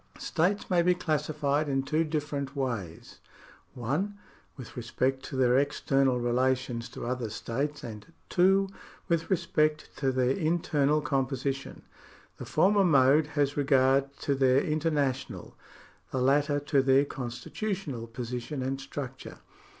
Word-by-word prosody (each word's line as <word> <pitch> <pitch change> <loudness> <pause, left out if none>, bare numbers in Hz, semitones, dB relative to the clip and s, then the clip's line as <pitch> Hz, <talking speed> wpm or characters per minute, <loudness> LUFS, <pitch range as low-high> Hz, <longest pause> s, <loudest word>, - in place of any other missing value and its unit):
States 190 +8 0
may 180 -5 +3
be 180 +1 +3
classified 150 -2 0
in 135 -1 0
two 155 +4 +1
different 150 -3 -3
ways: 115 -12 -4 0.6
(1) 150 - -2 0.4
with 130 -4 -10
respect 130 +3 -1
to 135 - -7
their 130 0 +4
external 135 -2 +1
relations 125 -1 0
to - - -7
other 125 -2 -2
states 140 +7 -3
and 105 -3 -9 0.2
(2) 195 +2 +4 0.4
with 170 -2 0
respect 155 -5 0
to 135 -2 0
their 130 -1 +1
internal 155 -3 +1
composition. 135 0 -2 0.5
The - - -7
former 185 - +3
mode 145 -2 +5
has 145 0 +2
regard 135 -1 +3
to 140 - +1
their 135 0 +3
international, 150 -4 -1 0.5
the 130 - -2
latter 145 +3 +2
to 145 -1 +2
their 135 +1 +4
constitu 130 - -5
tional 130 -12 -6
position 125 +3 -4
and 135 +1 -2
structure. 135 -1 -7
140 Hz, 130 wpm, -28 LUFS, 130-155 Hz, 0.6 s, mode